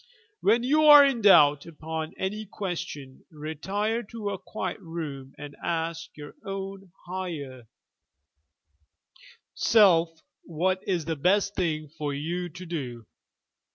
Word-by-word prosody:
When 230 +4 +3
you 305 +4 +3
are 295 -1 +10
in 265 -4 0
doubt 150 -8 +6
upon 160 0 -6
any 210 +3 -3
question, 160 -9 -6
retire 190 +9 -3
to 210 -2 -5
a 195 - -5
quiet 185 0 -5
room 155 -7 -7
and 145 -1 -9
ask 165 -1 -3
your 145 -1 -9
own 195 -1 -6
higher 155 -10 -6 1.9
self 180 -7 +5 0.3
what 185 +3 -1
is 175 -5 0
the 165 0 -2
best 200 +6 +2
thing 155 -5 -2
for 145 -1 -4
you 175 +5 -3
to 185 +3 -10
do. 130 -9 -5
175 Hz, 120 wpm, -27 LUFS, 150-195 Hz, 1.9 s, are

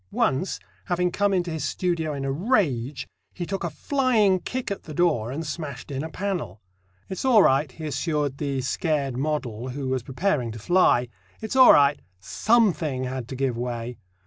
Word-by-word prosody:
Once, 135 - 0 0.3
having 180 -1 0
come 205 +2 +1
into 180 -3 0
his 160 -3 -3
studio 165 0 -1
in 140 -1 -4
a 135 - -1
rage, 145 - 0 0.3
he 175 - -4
"took 195 +2 -4
a 170 - -1
flying 225 - +2
kick 255 +3 -4
at 200 - -3
the 155 - -8
door, 145 -10 +1
and 160 +4 -4
smashed 145 -4 -6
in 135 +1 -3
a 160 - -5
panel." 175 - -4 0.5
"It's 190 - -5
all 240 -6 +6
right," 135 +1 +3
he 155 +5 -8
assured 145 -1 -1
the 140 -3 -1
scared 140 0 -1
model, 130 -4 -2
who 135 +1 -4
was 130 -1 0
preparing 135 - -1
to - - -8
fly; 125 - +3 0.3
"it's 220 +3 -5
all 260 -1 +9
right 145 0 +4 0.2
something 170 - +1
had 130 -2 -4
to 130 - -6
give 130 -2 -1
way." 120 0 -4
150 Hz, 180 wpm, -25 LUFS, 130-180 Hz, 0.5 s, all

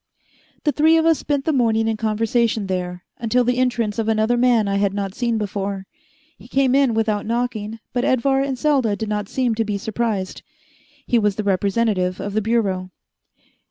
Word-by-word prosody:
The 295 - +2
three 315 +3 +4
of 325 - +2
us 325 -2 +4
spent 285 -2 -1
the 315 - +1
morning 225 -4 +2
in 225 - 0
conversation 220 0 0
there, 180 -1 -3
until 240 +2 +1
the 245 +1 0
entrance 235 -4 0
of 220 - -1
another 220 +2 +2
man 240 -3 +3
I 200 0 0
had 200 -1 +1
not 195 -2 -3
seen 235 -1 -1
before. 200 -2 -3 0.5
He - - -14
came 265 0 +2
in 270 -4 +3
without 215 -2 0
knocking, 230 -2 -2 0.2
but 245 0 0
Edvar 270 +2 +2
and 275 -1 -2
Selda 265 -7 +2
did 220 0 -4
not 210 -1 -2
seem 250 -3 0
to 225 +1 0
be 210 -2 -2
surprised. 215 -2 -3 0.6
He 240 - +2
was 210 -2 +1
the 215 - -3
representative 195 -1 0
of 205 - -4
the 215 - +1
Bureau. 200 -5 0
225 Hz, 190 wpm, -21 LUFS, 205-245 Hz, 0.6 s, three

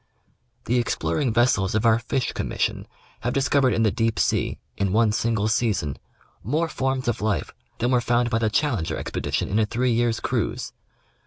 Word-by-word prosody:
The 125 +1 +2
exploring 130 +2 0
vessels 110 -4 +2
of 110 +1 +1
our 115 0 +5
Fish 120 +2 -2
Commission - - -2 0.3
have 120 - -2
discovered 135 -1 +3
in 115 - +1
the 110 - +3
deep 115 +2 0
sea, - - +1 0.2
in 100 -2 0
one 110 -1 +4
single 110 -1 0
season, 105 - 0 0.5
more 155 - 0
forms 130 -3 -1
of 120 - -1
life 105 -1 -1 0.2
than 120 +2 0
were 125 -1 +3
found 120 0 +1
by 115 - +2
the 110 -1 +1
Challenger 110 - 0
Expedition - - -2
in 105 - 0
a 110 - +3
three 125 +3 0
years' 115 -1 +1
cruise. - - -2
115 Hz, 175 wpm, -24 LUFS, 110-125 Hz, 0.5 s, our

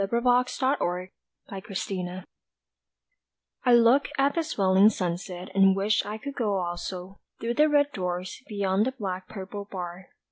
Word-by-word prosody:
_ - - +2
IN 195 - -2
TROUBLE 245 -5 +1 0.5
AND 195 0 -6
SHAME 185 -1 -4 1.4
I 250 - +3
LOOK 240 +4 +5
at 275 +1 +3
the 335 - +1
swaling 200 -9 +4
sunset 180 -1 -4
And 195 0 +5
wish 200 +2 +2
I 210 +1 -4
could 280 +5 -6
go 210 -6 0
also 180 +1 -5 0.2
Through 235 +1 -1
the 300 +5 +4
red 290 -1 +3
doors 180 -4 -4
beyond 200 +1 +1
the 260 - -2
black 190 -6 -5
purple 200 0 -7
bar. 180 -1 -6
195 Hz, 150 wpm, -27 LUFS, 185-240 Hz, 1.4 s, LOOK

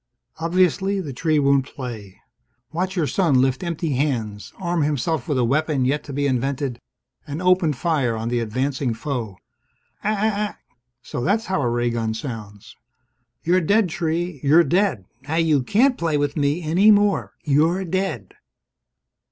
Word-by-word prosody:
Obviously, 185 +3 +1
the 150 -7 -5
tree 155 +4 +1
won't 140 -1 +3
play. 115 -9 -8 0.5
Watch 185 +3 -2
your 170 -4 +1
son 150 -5 +2
lift 130 +4 +1
empty 170 -2 -2
hands, 115 -7 -2
arm 175 -3 -1
himself 150 -1 -1
with 145 - 0
a 125 - +2
weapon 140 +1 +1
yet 145 +3 0
to 145 - -7
be 140 +1 -1
invented, 135 -1 -1 0.5
and 145 +2 -4
open 180 -3 +3
fire 135 -4 0
on 115 +1 -3
the 120 0 0
advancing 130 +2 -1
foe. 115 -6 -4 0.7
"Aa 210 - +1
aa 215 0 0
aa!" - - -16 0.5
So 120 - -5
that's 215 - +1
how 190 -6 -1
a 120 - +1
ray 120 0 0
gun 115 -1 -2
sounds! 110 -4 -8 0.7
"You're 180 +2 +3
dead, 200 +3 +2
tree! 165 0 -2
You're 155 +5 +5
dead! 175 - +1 0.2
Now 160 - -1
you 160 -4 +3
can't 245 - +2
play 160 -3 +1
with 145 0 -1
me 150 +3 0
any 175 +7 +4
more. 205 -1 +3
You're 160 +6 +2
dead!" 180 - -3
150 Hz, 160 wpm, -22 LUFS, 125-175 Hz, 0.7 s, You're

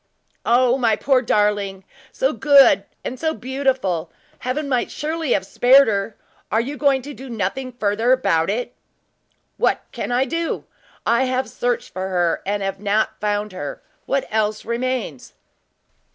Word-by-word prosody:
"O, 245 +2 +4
my 225 -4 +3
poor 265 +3 +2
darling! 205 -4 0 0.3
so 265 +3 0
good 285 -3 +6 0.2
and 255 - -5
so 315 -1 0
beautiful. 255 - -1 0.3
Heaven 280 +4 -2
might 255 -3 0
surely 315 -2 -2
have 190 - 0
spared 260 +7 +5
her! 200 0 -1 0.3
Are 220 - +3
you 265 +5 -3
going 275 -3 +2
to 290 +2 -7
do 265 0 -10
nothing 235 +4 -3
farther 225 +1 +1
about 165 -11 +2
it?" 240 +4 -2 0.8
"What - - +1
can - - -4
I 250 +2 +2
do? 330 +2 -2 0.4
I 235 +3 +3
have 255 0 -1
searched 245 -1 -2
for 190 0 -3
her 175 -2 +1
and 205 0 -1
have 195 0 -3
not 210 +1 0
found 210 0 -1
her, 145 -6 -5
and - - -26
what 275 0 0
else 215 0 0
remains?" 235 - -3
240 Hz, 155 wpm, -21 LUFS, 205-265 Hz, 0.8 s, good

